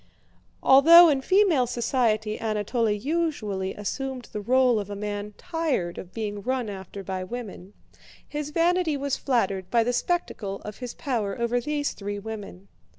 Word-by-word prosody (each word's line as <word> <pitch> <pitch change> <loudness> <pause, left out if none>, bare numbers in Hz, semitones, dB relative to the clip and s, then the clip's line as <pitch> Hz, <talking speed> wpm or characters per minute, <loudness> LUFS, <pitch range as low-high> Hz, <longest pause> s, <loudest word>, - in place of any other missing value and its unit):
Although 330 +6 +9
in 275 -3 +1
female 355 -7 +3
society 230 -3 0
Anatole 220 +1 0
usually 210 - -2
assumed 255 +4 -4
the 210 - -4
role 250 0 +3
of 205 -1 -6
a 205 - -5
man 205 0 -5
tired 300 - -2
of 180 - -9
being 205 -2 -4
run 250 -2 -2
after 195 0 -8
by 185 0 -4
women, 205 -3 -8 0.5
his 295 0 -4
vanity 335 -1 +1
was 280 -1 -1
flattered 195 -8 -1
by 235 -1 +3
the 245 +2 0
spectacle 240 - -2
of 210 0 -8
his 250 -2 -6
power 225 -7 -2
over 235 +1 0
these 290 +2 -2
three 205 0 -5
women. 200 -3 -8
230 Hz, 150 wpm, -26 LUFS, 205-275 Hz, 0.5 s, Although